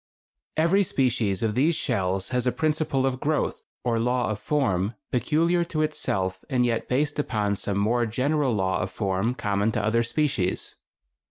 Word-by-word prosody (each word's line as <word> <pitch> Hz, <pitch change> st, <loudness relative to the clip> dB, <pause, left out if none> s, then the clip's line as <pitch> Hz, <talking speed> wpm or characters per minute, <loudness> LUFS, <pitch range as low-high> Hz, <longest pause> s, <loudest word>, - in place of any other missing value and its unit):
Every 170 Hz, +5 st, +4 dB
species 120 Hz, -, 0 dB
of 110 Hz, -1 st, +1 dB
these 150 Hz, +8 st, +2 dB
shells 95 Hz, -, -1 dB
has 125 Hz, -1 st, 0 dB
a -, -, +4 dB
principle 155 Hz, -3 st, 0 dB
of 130 Hz, -1 st, -1 dB
growth, 150 Hz, +2 st, -1 dB, 0.2 s
or 115 Hz, -2 st, +1 dB
law 125 Hz, 0 st, +1 dB
of 105 Hz, -, -3 dB
form, 110 Hz, -7 st, 0 dB, 0.2 s
peculiar 165 Hz, +7 st, +2 dB
to 155 Hz, -2 st, -1 dB
itself 95 Hz, -11 st, -2 dB
and 125 Hz, -2 st, +2 dB
yet 115 Hz, -2 st, -1 dB
based 145 Hz, +3 st, 0 dB
upon 105 Hz, -7 st, 0 dB
some 100 Hz, 0 st, -2 dB
more 115 Hz, +4 st, +2 dB
general 135 Hz, +4 st, +1 dB
law 95 Hz, -4 st, 0 dB
of -, -, -2 dB
form 100 Hz, +4 st, -1 dB
common 100 Hz, -1 st, 0 dB
to 105 Hz, -, 0 dB
other 115 Hz, +2 st, +2 dB
species.... 120 Hz, -6 st, -1 dB
125 Hz, 165 wpm, -25 LUFS, 105-150 Hz, 0.2 s, Every